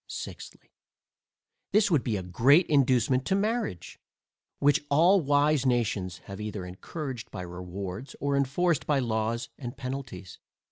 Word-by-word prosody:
Sixthly, -, -, -8 dB, 1.0 s
This 210 Hz, -1 st, +4 dB
would 150 Hz, -6 st, +3 dB
be 110 Hz, -4 st, -1 dB
a 95 Hz, -, -5 dB
great 130 Hz, -, +4 dB
inducement 130 Hz, -2 st, +3 dB
to 190 Hz, -, +2 dB
marriage, 215 Hz, -, -2 dB, 0.6 s
which 145 Hz, 0 st, +3 dB
all 175 Hz, +7 st, +5 dB
wise 145 Hz, -1 st, +3 dB
nations 110 Hz, -8 st, 0 dB
have 100 Hz, +1 st, -8 dB
either 105 Hz, -3 st, -5 dB
encouraged 120 Hz, -, -6 dB
by 90 Hz, -, -6 dB
rewards, 90 Hz, +6 st, -7 dB
or 140 Hz, 0 st, 0 dB
enforced 140 Hz, +4 st, +1 dB
by 150 Hz, -, +3 dB
laws 115 Hz, -1 st, -1 dB
and 125 Hz, -1 st, -7 dB
penalties. 125 Hz, -9 st, -6 dB
130 Hz, 135 wpm, -28 LUFS, 105-145 Hz, 1.0 s, all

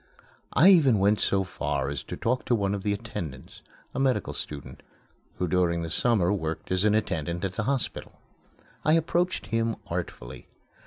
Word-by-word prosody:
I 190 Hz, -, +7 dB
even 145 Hz, -, +6 dB
went 100 Hz, +2 st, +3 dB
so 95 Hz, 0 st, +2 dB
far 90 Hz, -6 st, -2 dB
as 70 Hz, -3 st, -3 dB
to -, -, -6 dB
talk 125 Hz, +2 st, 0 dB
to 125 Hz, -, +2 dB
one 100 Hz, -2 st, 0 dB
of 100 Hz, -, -2 dB
the 105 Hz, -, 0 dB
attendants, 85 Hz, -, -6 dB, 0.3 s
a -, -, -3 dB
medical 135 Hz, -2 st, +1 dB
student, 75 Hz, -1 st, -7 dB, 0.6 s
who 90 Hz, -, -1 dB
during 85 Hz, -1 st, +1 dB
the 80 Hz, -, -5 dB
summer 100 Hz, -2 st, +3 dB
worked 80 Hz, -4 st, -4 dB
as 95 Hz, +1 st, +2 dB
an 105 Hz, 0 st, +4 dB
attendant 85 Hz, -4 st, -1 dB
at 95 Hz, -, -3 dB
the 105 Hz, +2 st, -2 dB
hospital. 135 Hz, -2 st, -3 dB, 0.6 s
I 155 Hz, -, +4 dB
approached 170 Hz, +3 st, +1 dB
him 115 Hz, 0 st, 0 dB
artfully. -, -, -6 dB
100 Hz, 170 wpm, -27 LUFS, 85-120 Hz, 0.6 s, I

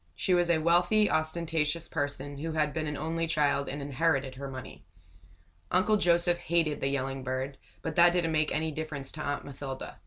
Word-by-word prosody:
She 185 Hz, -, +1 dB
was 175 Hz, -1 st, +3 dB
a 170 Hz, -, +4 dB
wealthy, 175 Hz, +6 st, +3 dB
ostentatious 160 Hz, 0 st, 0 dB
person, 145 Hz, 0 st, -3 dB
who 160 Hz, +2 st, -3 dB
had 150 Hz, -2 st, +1 dB
been 155 Hz, -1 st, -2 dB
an 150 Hz, -1 st, -3 dB
only 165 Hz, +2 st, -2 dB
child 145 Hz, -3 st, +1 dB
and 140 Hz, +1 st, -5 dB
inherited 140 Hz, -1 st, 0 dB
her 135 Hz, +1 st, -6 dB
money. 130 Hz, -1 st, -9 dB, 0.9 s
Uncle 190 Hz, +4 st, +3 dB
Joseph 175 Hz, -1 st, +3 dB
hated 165 Hz, -3 st, 0 dB
the 135 Hz, -, +1 dB
yelling 135 Hz, -1 st, -2 dB
bird, 130 Hz, +1 st, -3 dB, 0.2 s
but 160 Hz, -2 st, -3 dB
that 175 Hz, 0 st, +7 dB
didn't 175 Hz, -2 st, +1 dB
make 155 Hz, -1 st, +1 dB
any 160 Hz, +1 st, -1 dB
difference 150 Hz, -3 st, -4 dB
to 155 Hz, -, -7 dB
Aunt 145 Hz, -1 st, -2 dB
Mathilda. 135 Hz, -4 st, -7 dB
155 Hz, 185 wpm, -29 LUFS, 140-170 Hz, 0.9 s, that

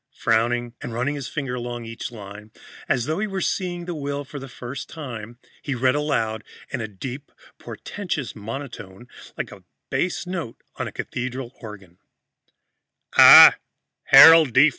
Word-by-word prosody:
Frowning 120 Hz, +1 st, 0 dB
and 115 Hz, -, -6 dB
running 125 Hz, +5 st, -1 dB
his 140 Hz, -3 st, -6 dB
finger 135 Hz, -5 st, -5 dB
along 120 Hz, -1 st, -6 dB
each 115 Hz, +1 st, -7 dB
line, 105 Hz, -1 st, -11 dB, 0.4 s
as 120 Hz, -, 0 dB
though 155 Hz, +5 st, -2 dB
he 215 Hz, -, -1 dB
were 195 Hz, -2 st, -4 dB
seeing 175 Hz, -1 st, -3 dB
the 175 Hz, -, -5 dB
will 145 Hz, -2 st, -4 dB
for 145 Hz, +1 st, -9 dB
the 135 Hz, -, -9 dB
first 125 Hz, +2 st, -8 dB
time, 120 Hz, -7 st, -8 dB, 0.2 s
he 140 Hz, -, -4 dB
read 130 Hz, +1 st, +2 dB
aloud 115 Hz, -7 st, -2 dB, 0.3 s
in 125 Hz, -, -3 dB
a 110 Hz, -, -4 dB
deep 125 Hz, +8 st, -9 dB, 0.3 s
portentous 175 Hz, -10 st, -6 dB
monotone, 115 Hz, -2 st, -9 dB, 0.3 s
like -, -, -5 dB
a -, -, -14 dB, 0.3 s
bass 180 Hz, 0 st, -2 dB
note 170 Hz, -10 st, -6 dB, 0.2 s
on -, -, -3 dB
a -, -, -7 dB
cathedral 125 Hz, 0 st, -6 dB
organ. 100 Hz, -6 st, -12 dB, 1.2 s
"I, -, -, +10 dB, 0.5 s
Harold 160 Hz, -5 st, +8 dB
D. 135 Hz, +5 st, +6 dB
125 Hz, 155 wpm, -22 LUFS, 115-150 Hz, 1.2 s, I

